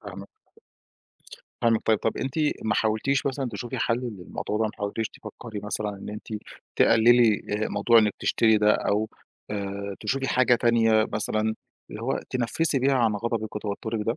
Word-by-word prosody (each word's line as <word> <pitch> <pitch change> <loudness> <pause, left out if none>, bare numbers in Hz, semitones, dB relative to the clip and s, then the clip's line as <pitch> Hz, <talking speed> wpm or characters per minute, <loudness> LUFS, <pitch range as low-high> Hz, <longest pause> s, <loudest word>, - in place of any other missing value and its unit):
فاهمِك. - - -9 1.4
فاهمِك 115 -2 +3
طيب، 110 -1 +4
طَب - - -1
أنتِ 130 0 -3 0.3
ما 110 - +1
حاولتيش 110 +6 +1
مثلًا 135 -1 -1
تشوفي 110 +3 -5
حَل 115 - +1 0.2
للموضوع 90 +4 -4
ده؟ 110 - +2
ما 110 - -1
حاولتيش 105 +2 -2
تفكّري 110 -3 -9
مثلًا 105 +1 -3
إن 100 -1 -7
أنتِ 105 +1 -9 0.5
تقللي 115 -1 +5 0.2
آآ، - - 0
موضوع 115 +3 +4
إنِّك 105 -2 +3
تشتري 110 -2 +3
ده، 105 0 +4
أو 105 +1 0 0.4
آآ، 100 -1 -4
تشوفي 135 +5 -1
حاجة 125 -1 +4
تانية 115 -2 +3
مثلًا، 110 +1 0 0.4
اللي 105 - -7
هو 130 +3 -1
تنفسي 135 +4 0
بيها 135 +2 +2
عن 115 -4 +3
غضبِك 110 -1 -3
وتوترِك 110 +2 -3
ده؟ 115 - 0
110 Hz, 160 wpm, -26 LUFS, 105-120 Hz, 1.4 s, تقللي